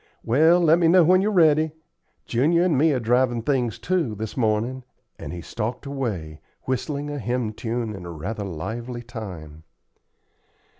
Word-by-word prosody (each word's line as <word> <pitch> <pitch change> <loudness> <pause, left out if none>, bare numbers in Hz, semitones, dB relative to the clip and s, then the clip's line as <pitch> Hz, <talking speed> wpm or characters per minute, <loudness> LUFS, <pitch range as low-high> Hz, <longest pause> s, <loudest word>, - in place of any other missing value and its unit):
Well, 160 +9 +4
let 165 -1 +4
me 170 - +4
know 180 +1 +6
when 185 +3 +5
you're 205 - +1
ready. 160 -4 +4 0.5
Junior 155 +9 +2
and 180 -4 +2
me 155 +4 +4
are 135 - +1
drivin' 120 0 +1
things, 125 -5 0
too, 170 -12 -1
this 110 +1 -6
mornin';" 120 +2 0 0.4
and 70 - -7
he 85 0 -6
stalked 120 - -4
away, 100 - -4 0.2
whistling 145 +3 -3
a 145 - -4
hymn 120 -1 -2
tune 115 0 -3
in 90 -3 -8
rather 90 +6 -5
lively 115 +7 -5
time. 90 - -8
120 Hz, 155 wpm, -24 LUFS, 110-150 Hz, 0.5 s, know